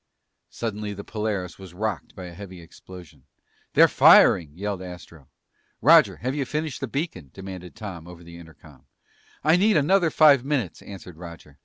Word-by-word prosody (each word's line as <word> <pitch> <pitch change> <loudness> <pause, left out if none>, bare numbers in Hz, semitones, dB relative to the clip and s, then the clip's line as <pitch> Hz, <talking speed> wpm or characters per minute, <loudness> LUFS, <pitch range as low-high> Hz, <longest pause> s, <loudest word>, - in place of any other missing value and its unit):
Suddenly 105 -2 -5
the 100 - -8
Polaris 105 -6 -4
was 95 -2 -12
rocked 105 -6 -4
by 95 - -9
a 90 - -10
heavy 95 0 -11
explosion. 85 -3 -15 0.5
"They're - - +6
firing!" 80 -5 +5
yelled 100 -1 -4
Astro. 90 -5 -12 0.5
"Roger! - - +5
Have 130 +2 -3
you 145 -1 -2
finished 150 +1 -4
the 135 - -3
beacon?" 125 - -5
demanded 95 -2 -9
Tom 95 -7 -9
over 90 -1 -13
the 85 0 -13
intercom. 80 -3 -17 0.6
"I 155 +4 +4
need 205 0 +3
another 170 +4 +2
five 145 -5 +5
minutes!" 135 - -3
answered 90 -4 -11
Roger. 85 -3 -12
95 Hz, 160 wpm, -24 LUFS, 85-130 Hz, 0.6 s, They're